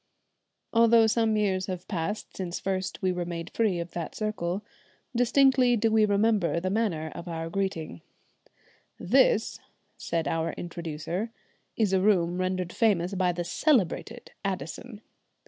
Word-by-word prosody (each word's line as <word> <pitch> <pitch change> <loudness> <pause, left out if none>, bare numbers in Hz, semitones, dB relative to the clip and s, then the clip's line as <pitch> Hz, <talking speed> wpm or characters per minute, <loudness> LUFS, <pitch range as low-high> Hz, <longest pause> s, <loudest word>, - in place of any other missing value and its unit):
Although 230 -1 +6
some 220 0 +2
years 190 -3 0
have 185 -1 -5
passed 200 +2 -4
since 180 -2 -4
first 190 -1 -3
we 185 - +2
were 180 -1 -2
made 170 0 -6
free 215 -6 +1
of 170 0 -5
that 170 -2 -5
circle, 210 -3 -2 0.5
distinctly 250 0 +4
do 225 +1 +2
we 220 -1 +5
remember 205 -4 +2
the 185 +2 -2
manner 180 -8 -1
of 170 +1 -8
our 165 -1 -4
greeting 185 - -3 1.0
"This," - - +3 0.4
said 165 -1 -2
our 165 0 -1
introducer, 170 +4 -5 0.5
"is 210 -4 +2
a 190 - +3
room 180 -3 +2
rendered 185 -1 -2
famous 200 -5 +2
by 185 -2 +2
the 175 0 -3
celebrated 235 - 0
Addison." 195 - -5
190 Hz, 140 wpm, -27 LUFS, 170-220 Hz, 1.0 s, Although